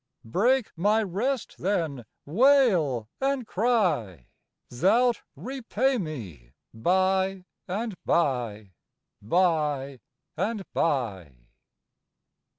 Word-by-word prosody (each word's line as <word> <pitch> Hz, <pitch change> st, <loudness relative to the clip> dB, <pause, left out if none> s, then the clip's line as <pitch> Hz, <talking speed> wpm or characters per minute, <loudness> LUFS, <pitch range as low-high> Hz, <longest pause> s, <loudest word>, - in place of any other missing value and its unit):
Break 230 Hz, -, +2 dB
my 210 Hz, +6 st, +2 dB
rest, 225 Hz, +7 st, -2 dB
then, 165 Hz, -, -1 dB, 0.2 s
wail 180 Hz, -, +3 dB
and 270 Hz, -2 st, 0 dB
cry 175 Hz, -, 0 dB, 0.5 s
Thou'lt 230 Hz, -, +3 dB
repay 260 Hz, 0 st, -1 dB
me 95 Hz, -, -7 dB, 0.2 s
by 190 Hz, +7 st, +1 dB, 0.2 s
and 210 Hz, +4 st, -3 dB
by 120 Hz, -, 0 dB, 0.5 s
by 150 Hz, -, +1 dB, 0.4 s
and 215 Hz, -2 st, -2 dB
by." 110 Hz, -, -1 dB
180 Hz, 75 wpm, -26 LUFS, -, 0.5 s, wail